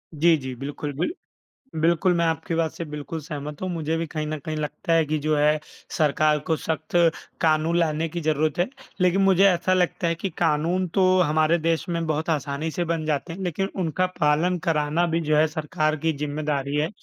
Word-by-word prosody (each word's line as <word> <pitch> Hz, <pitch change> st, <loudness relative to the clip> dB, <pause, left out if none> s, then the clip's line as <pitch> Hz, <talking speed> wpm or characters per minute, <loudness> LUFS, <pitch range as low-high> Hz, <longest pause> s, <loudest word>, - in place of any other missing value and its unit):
जी, 165 Hz, +2 st, +5 dB
जी, 130 Hz, -2 st, -6 dB
बिल्कुल, 145 Hz, +3 st, -5 dB
बिल 175 Hz, -, 0 dB, 0.7 s
बिल्कुल 170 Hz, +2 st, +3 dB
मैं 170 Hz, -, +2 dB
आपकी 165 Hz, +1 st, -1 dB
बात 165 Hz, -1 st, 0 dB
से 170 Hz, -, -6 dB
बिल्कुल 150 Hz, +1 st, -6 dB
सहमत 150 Hz, -1 st, -7 dB
हूँ, 185 Hz, -, -1 dB
मुझे 160 Hz, -1 st, -2 dB
भी 165 Hz, 0 st, -2 dB
कहीं 155 Hz, 0 st, -4 dB
न 155 Hz, 0 st, -3 dB
कहीं 155 Hz, -1 st, -3 dB
लगता 155 Hz, +2 st, -3 dB
है 165 Hz, -1 st, +4 dB
कि 155 Hz, +1 st, 0 dB
जो 155 Hz, +1 st, 0 dB
है, 150 Hz, +1 st, +3 dB, 0.3 s
सरकार 150 Hz, 0 st, +2 dB
को 160 Hz, -, +1 dB
सख्त 160 Hz, +2 st, -3 dB, 0.4 s
कानून 160 Hz, +1 st, +2 dB
लाने 160 Hz, 0 st, 0 dB
की 170 Hz, +2 st, -4 dB
जरूरत 155 Hz, 0 st, 0 dB
है। 175 Hz, -, +2 dB, 0.3 s
लेकिन 180 Hz, +2 st, +3 dB
मुझे 195 Hz, 0 st, +5 dB
ऐसा 185 Hz, +1 st, +1 dB
लगता 180 Hz, -1 st, +1 dB
है 165 Hz, -, +1 dB
कि 185 Hz, +3 st, -4 dB
कानून 170 Hz, +3 st, +1 dB
तो 190 Hz, -1 st, +4 dB
हमारे 155 Hz, +1 st, +3 dB
देश 165 Hz, +3 st, -1 dB
में 170 Hz, -1 st, -1 dB
बहुत 155 Hz, +1 st, -1 dB
आसानी 150 Hz, +1 st, -2 dB
से 175 Hz, +2 st, -2 dB
बन 165 Hz, -1 st, -2 dB
जाते 155 Hz, +3 st, -1 dB
हैं, 190 Hz, -, -8 dB
लेकिन 185 Hz, +3 st, -1 dB
उनका 180 Hz, +2 st, +1 dB
पालन 160 Hz, +5 st, +2 dB
कराना 155 Hz, +1 st, +1 dB
भी 165 Hz, 0 st, 0 dB
जो 155 Hz, -1 st, +1 dB
है 155 Hz, +1 st, +5 dB
सरकार 155 Hz, 0 st, -1 dB
की 160 Hz, -, +3 dB
जिम्मेदारी 145 Hz, -1 st, -2 dB
है 155 Hz, +2 st, +1 dB
160 Hz, 205 wpm, -24 LUFS, 150-170 Hz, 0.7 s, जी